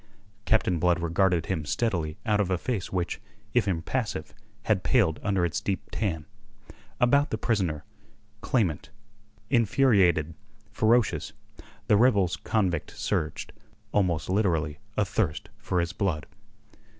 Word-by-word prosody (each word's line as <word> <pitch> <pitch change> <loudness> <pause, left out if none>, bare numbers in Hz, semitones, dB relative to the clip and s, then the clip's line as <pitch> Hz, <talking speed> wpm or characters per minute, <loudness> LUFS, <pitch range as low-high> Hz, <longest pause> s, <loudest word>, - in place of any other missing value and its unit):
Captain 95 -6 +2
Blood 90 0 +2
regarded 85 0 +1
him 85 -5 -2
steadily 80 -1 -1
out 105 -2 +2
of 95 - -1
a 90 - +1
face 110 -1 -3
which, 90 -2 -2 0.3
if 120 -4 +2
impassive, 95 +1 -2 0.3
had 105 -4 +1
paled 100 - +2
under 95 -4 +1
its 85 - -2
deep 100 -2 -3
tan. 85 -8 -2 0.7
About 140 +4 +4
the 110 - -2
prisoner, 95 -10 -1 0.6
clamant, 95 - 0 0.6
infuriated, 100 - +3 0.4
ferocious, 110 +2 +2 0.5
the 105 - +4
rebels 100 -7 +3
convict 95 -7 -1
surged, 80 - -2 0.4
almost 85 -6 +1
literally 85 -7 0 0.2
"athirst 75 -1 -1
for 90 - -1
his 85 0 -1
blood." 90 -7 -1
95 Hz, 120 wpm, -27 LUFS, 85-110 Hz, 0.7 s, About